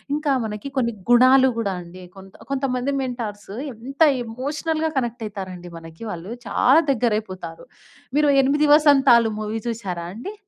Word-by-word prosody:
ఇంకా 300 -2 0
మనకి 210 +6 -6
కొన్ని 235 -3 +1 0.2
గుణాలు 255 +2 +6
కూడా 200 -4 -1
అండి 180 +2 -12
కొంత 195 0 -14 0.2
కొంతమంది 265 0 -1
మెంటార్స్ 220 -6 -5 0.2
ఎంత 270 +7 -10 0.2
ఎమోషనల్‌గా 300 +7 -3
కనెక్ట్ 240 -1 -4
అయితారండి 185 -4 -8
మనకి 165 +5 -12
వాళ్ళు 175 +5 -7 0.2
చాలా 265 +9 +4
దగ్గరైపోతారు. 210 -9 -3 0.5
మీరు 300 -1 +4
8 295 +3 +2
వసంతాలు 270 -7 +5
మూవీ 215 +1 -3
చూసారా 190 -7 -5
అండి? 245 - -7
235 Hz, 130 wpm, -22 LUFS, 200-275 Hz, 0.5 s, గుణాలు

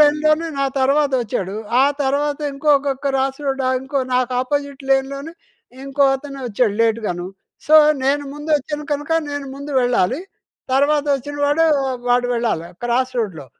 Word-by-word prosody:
లైన్‌లోనే 305 +2 +4
నా - - +2 0.2
తర్వాత 280 +2 +3
వచ్చాడు. 195 -3 -3 0.3
ఆ - - +6 0.2
తర్వాత 285 +1 0
ఇంకొక్క 280 0 +2
క్రాస్ 270 -1 0
రోడా 270 -1 0
ఇంకో 270 +2 -3 0.2
నాకాపోజిట్ 260 +3 -1
లేన్‍లోనే 275 +3 0 0.5
ఇంకో 275 +1 +1
అతనొచ్చాడు 255 -6 -2
లేట్‌గాను. 215 -6 -1 0.4
సో, 310 - +4 0.3
నేను 285 +2 +1
ముందు 295 +2 -6
వచ్చాను 295 +1 -5
కనుక, 295 +2 -4 0.2
నేను 285 -1 -4
ముందు 280 +1 -8
వెళ్ళాలి. 245 - +1 0.5
తర్వాత 285 +2 +3
వచ్చిన 290 +2 -7
వాడు 295 +3 +3 0.4
వాడు 245 0 +3
వెళ్ళాలా 225 -8 -1 0.2
క్రాస్ 255 +2 0
రోడ్‍లో. 180 - -3
275 Hz, 130 wpm, -20 LUFS, 250-290 Hz, 0.5 s, ఆ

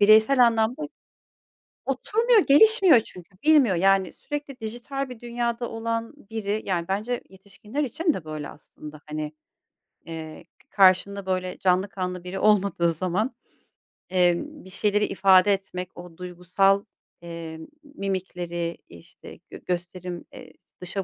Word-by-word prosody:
bireysel 220 +5 +6
anlamda 230 +5 +1 1.0
oturmuyor, 440 - +2
gelişmiyor 375 - +7
çünkü 180 -3 -11
bilmiyor, 290 -10 +5
yani, 190 0 +3
sürekli 290 -3 -7
dijital 245 +5 -5
bir 245 -3 -9
dünyada 235 0 -3
olan 230 +2 -3 0.2
biri, 215 -1 -2
yani 175 -3 -1
bence 215 +6 -2
yetişkinler 205 +8 -6
için 320 +5 0
de 180 - -6
böyle 155 -2 -6
aslında 150 0 -12
hani, 150 0 -4 0.7
eee, 160 -1 -8 0.3
karşında 195 +1 +3
böyle 185 -1 -2
canlı 185 +2 +2
kanlı 180 -2 -4
biri 185 +2 -5
olmadığı 200 -5 +3
zaman, 185 - -1 0.7
emm, 185 - +1
bir 190 - -11
şeyleri 210 +2 +1
ifade 195 0 +5
etmek, 185 -2 -5
o 175 -1 -11
duygusal, 180 +2 +1 0.4
eee, 165 -1 -8 0.2
mimikleri, 180 - -4
işte, 85 -1 -14
gö - - -10
gösterim, 175 0 -4
eee, - - -12 0.3
dışa 190 +2 -3
195 Hz, 125 wpm, -25 LUFS, 180-235 Hz, 1.0 s, gelişmiyor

